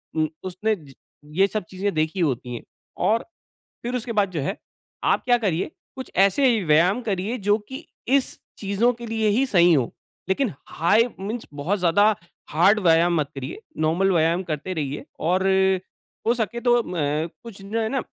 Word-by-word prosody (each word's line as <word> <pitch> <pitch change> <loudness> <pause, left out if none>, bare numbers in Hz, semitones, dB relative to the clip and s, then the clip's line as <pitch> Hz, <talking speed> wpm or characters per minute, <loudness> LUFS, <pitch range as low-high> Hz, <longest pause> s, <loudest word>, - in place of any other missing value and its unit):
उम, 155 -1 +2 0.2
उसने 190 +4 -1
ज 150 -7 -15 0.4
ये 195 +1 +5
सब 215 +1 -3
चीज़ें 195 +2 -2
देखी 160 +4 -1
होती 125 -6 -1
है। - - -6 0.4
और 225 +2 +1 0.6
फिर 240 +1 -3
उसके 240 -1 -3
बाद 205 -3 +2
जो 165 -4 -3
है, 140 - -2 0.5
आप - - +2
क्या 245 -1 +4
करिए, 190 - -1 0.3
कुछ 260 - -7
ऐसे 220 +5 +4
व्यायाम 170 +8 +4
करिए 205 +1 -2
जो 205 +1 +2
कि 270 +5 -7 0.2
इस 270 +1 +2 0.2
चीजज़ों 205 +4 +1
के 235 0 -9
लिए 220 -1 0
ही 240 +6 +2
सही 175 -7 +5
हो। 130 -7 +2 0.4
लेकिन 225 +4 +1 0.2
हाई 215 +9 +3
मीन्स 220 +4 -4
बहुत 160 +9 -1
ज़्यादा 205 +5 +4 0.4
हार्ड 190 +8 +4
व्यायाम 170 -1 +4
मत 145 - -3
करिए, 135 +7 -6 0.2
नॉर्मल 165 +5 +2
व्यायाम 170 +1 +2
करते 165 0 -4
रहिए 145 -3 -3 0.2
और 185 +4 +1 0.8
हो 235 - +4
सके 235 0 -2
तो 240 -1 +3
म 155 -1 -1 0.2
कुछ 210 -4 -10
जो 210 +4 -2
है 220 - 0
ना, 270 - -1
195 Hz, 175 wpm, -24 LUFS, 165-225 Hz, 0.8 s, ये